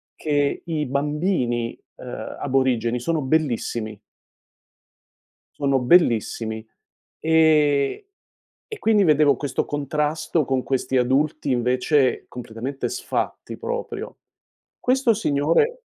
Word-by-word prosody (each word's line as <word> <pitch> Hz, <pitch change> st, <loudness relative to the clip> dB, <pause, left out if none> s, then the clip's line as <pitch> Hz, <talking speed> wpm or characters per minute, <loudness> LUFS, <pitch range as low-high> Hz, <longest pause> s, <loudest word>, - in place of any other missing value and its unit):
che 145 Hz, -2 st, 0 dB
i 155 Hz, -3 st, -2 dB
bambini, 140 Hz, -4 st, -1 dB, 0.2 s
uhm, -, -, -7 dB
aborigeni 125 Hz, -3 st, +1 dB
sono 160 Hz, +4 st, -1 dB
bellissimi 120 Hz, -7 st, -1 dB, 1.6 s
sono 140 Hz, -1 st, +3 dB
bellissimi. 115 Hz, -, +2 dB, 0.5 s
Ehm, 155 Hz, -, +3 dB, 0.7 s
e 435 Hz, -, -7 dB
quindi 210 Hz, -3 st, +3 dB
vedevo 150 Hz, -2 st, +4 dB
questo 140 Hz, -2 st, -2 dB
contrasto 150 Hz, +2 st, -1 dB
con 130 Hz, -1 st, -1 dB
questi 130 Hz, -1 st, -1 dB
adulti, 140 Hz, +4 st, +1 dB
invece, 125 Hz, +3 st, +1 dB
completamente 125 Hz, +3 st, -5 dB
sfatti -, -, -4 dB
proprio. 480 Hz, 0 st, -5 dB, 0.6 s
Questo 255 Hz, -2 st, +3 dB
signore 200 Hz, -, +1 dB
140 Hz, 90 wpm, -23 LUFS, 125-160 Hz, 1.6 s, vedevo